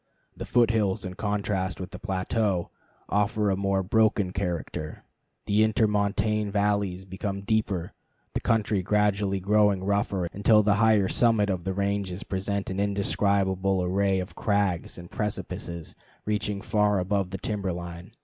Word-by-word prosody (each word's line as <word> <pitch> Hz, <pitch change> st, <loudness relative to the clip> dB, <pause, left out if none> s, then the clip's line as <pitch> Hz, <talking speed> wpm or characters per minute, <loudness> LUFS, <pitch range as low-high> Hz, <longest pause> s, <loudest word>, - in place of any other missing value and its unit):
The -, -, -7 dB
foot 120 Hz, -2 st, +4 dB
hills, 105 Hz, -3 st, 0 dB
in 90 Hz, -, -5 dB
contrast 100 Hz, -2 st, -2 dB
with 95 Hz, +1 st, -6 dB
the -, -, -8 dB
plateau, 95 Hz, -2 st, -1 dB, 0.4 s
afford 105 Hz, 0 st, +1 dB
a -, -, +1 dB
more 100 Hz, 0 st, 0 dB
broken 105 Hz, -1 st, +2 dB
character, 90 Hz, -5 st, -4 dB, 0.4 s
the 105 Hz, +1 st, +2 dB
intermontane 105 Hz, -1 st, +1 dB
valleys 100 Hz, -2 st, 0 dB
become 100 Hz, +1 st, -4 dB
deeper, 100 Hz, -4 st, -1 dB, 0.4 s
the -, -, 0 dB
country 110 Hz, -3 st, +1 dB
gradually 100 Hz, 0 st, +1 dB
growing 100 Hz, 0 st, +3 dB
rougher 100 Hz, -2 st, 0 dB
until 105 Hz, +2 st, +4 dB
the 100 Hz, 0 st, +4 dB
higher 110 Hz, -3 st, +4 dB
summit 110 Hz, -3 st, +3 dB
of 90 Hz, -2 st, -3 dB
the 95 Hz, -, -1 dB
ranges 100 Hz, -1 st, -1 dB
present 95 Hz, +1 st, -3 dB
an 95 Hz, -, -3 dB
indescribable 100 Hz, -2 st, +1 dB
array 95 Hz, +1 st, +1 dB
of 95 Hz, +2 st, -5 dB
crags 100 Hz, -5 st, 0 dB
and 85 Hz, 0 st, -10 dB
precipices 85 Hz, -5 st, -4 dB, 0.3 s
reaching 105 Hz, -1 st, -1 dB
far 105 Hz, -1 st, +2 dB
above 95 Hz, 0 st, 0 dB
the 95 Hz, -, -4 dB
timber 100 Hz, -1 st, -2 dB
line. 85 Hz, +4 st, -7 dB
100 Hz, 145 wpm, -27 LUFS, 95-105 Hz, 0.4 s, foot